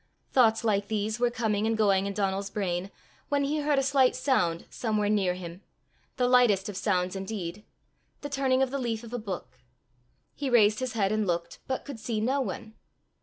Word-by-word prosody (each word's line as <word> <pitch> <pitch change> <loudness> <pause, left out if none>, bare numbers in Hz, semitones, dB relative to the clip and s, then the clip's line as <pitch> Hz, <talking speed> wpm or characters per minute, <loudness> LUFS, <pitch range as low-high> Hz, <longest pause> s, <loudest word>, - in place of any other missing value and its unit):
Thoughts 225 -3 +4
like 205 -2 +1
these 215 +1 -2
were 245 0 +3
coming 220 -3 0
and 225 0 0
going 200 -2 +3
in 200 - -3
Donal's 195 0 -1
brain, 185 -2 -2 0.4
when 285 -1 +2
he 295 +2 0
heard 295 -1 +1
a 270 - +3
slight 265 -1 +3
sound 175 -12 +1
somewhere 215 -3 -1
near 195 -4 +2
him 175 0 -8 0.6
the 250 -1 +2
lightest 240 -6 +4
of 205 - -6
sounds 185 -2 0
indeed 195 -1 -5 0.6
the 290 - -4
turning 265 -1 +2
of 260 - -1
the 275 - -2
leaf 235 -3 -2
of 230 0 -10
a 245 - -2
book. 200 -5 -7 0.7
He 280 -2 -3
raised 215 -3 +5
his 255 -1 -3
head 200 -3 +1
and 215 -1 0
looked, 170 -1 -2
but 260 - -3
could 280 -6 -7
see 220 0 -2
no 260 +6 +1
one. 220 -1 -5
215 Hz, 195 wpm, -28 LUFS, 195-250 Hz, 0.7 s, raised